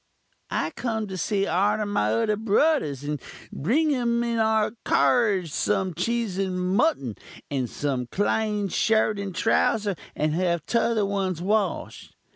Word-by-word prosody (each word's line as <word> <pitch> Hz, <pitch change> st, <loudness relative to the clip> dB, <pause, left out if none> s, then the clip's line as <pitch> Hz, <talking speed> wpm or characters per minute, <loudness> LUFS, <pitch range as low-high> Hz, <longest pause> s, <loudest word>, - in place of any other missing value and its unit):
"'I 155 Hz, -, -1 dB
kum 220 Hz, -1 st, -3 dB
to 190 Hz, -, -5 dB
see 195 Hz, +2 st, 0 dB
arter 200 Hz, +5 st, +1 dB
my 110 Hz, -, 0 dB
udder 115 Hz, -, +1 dB
brudurs, 215 Hz, -, +1 dB
and 145 Hz, -2 st, -3 dB, 0.3 s
bring 285 Hz, -, +1 dB
um 235 Hz, -1 st, +1 dB
in 235 Hz, -1 st, -1 dB
our 220 Hz, -1 st, +2 dB
carruge 200 Hz, -9 st, +2 dB
some 190 Hz, +1 st, 0 dB
cheese 205 Hz, +2 st, -1 dB
and 190 Hz, -2 st, -1 dB
muttun, 180 Hz, -, +1 dB, 0.4 s
and 130 Hz, -4 st, -1 dB
some 130 Hz, -4 st, -2 dB
clene 210 Hz, -, 0 dB
shirt 215 Hz, +1 st, +2 dB
and 195 Hz, -3 st, -5 dB
trowser, 210 Hz, -1 st, +1 dB, 0.2 s
and 155 Hz, 0 st, 0 dB
have 170 Hz, -1 st, 0 dB
tother 230 Hz, -3 st, +1 dB
ones 195 Hz, -3 st, -1 dB
wash'd. 200 Hz, +1 st, -2 dB
200 Hz, 140 wpm, -25 LUFS, 170-220 Hz, 0.4 s, our